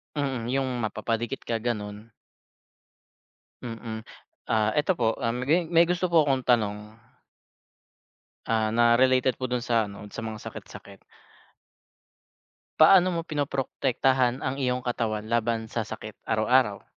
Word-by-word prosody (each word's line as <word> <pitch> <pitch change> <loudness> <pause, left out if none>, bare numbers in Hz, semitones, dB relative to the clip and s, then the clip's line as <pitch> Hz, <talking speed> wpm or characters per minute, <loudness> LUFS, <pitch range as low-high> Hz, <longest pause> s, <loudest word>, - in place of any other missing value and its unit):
Mm, 135 -5 -2
yung 135 -1 0
mapapadikit 115 +3 -3
ka, 115 -1 -2
ganun. 105 -1 -5 1.5
Mm, 115 -1 -6 0.5
ah, 110 -1 +3
eto 155 +6 +2
po, 115 -7 0
ah, 115 0 -1
may 150 +8 +1
may 170 +1 +4
gusto 180 +1 0
po 160 - +7
akong 135 -2 0
tanong. 105 -4 +2 1.7
Ah, 110 -1 +1
na 120 0 +4
related 130 0 +3
po 130 - -2
dun 125 -1 -1
sa, 115 -4 +1
ano, 100 +1 -10
sa 115 - -5
mga 110 -1 -5
sakit-sakit. - - -10 1.8
Paano 185 +3 +7
mo 170 -2 -1
prinoprotektahan 135 -3 0
ang 135 +1 -2
iyong 125 0 -1
katawan 110 -3 -2
laban 115 0 0
sa 115 +1 -3
sakit 110 0 -7 0.2
araw-araw? 110 -1 +2
120 Hz, 125 wpm, -26 LUFS, 110-135 Hz, 1.8 s, po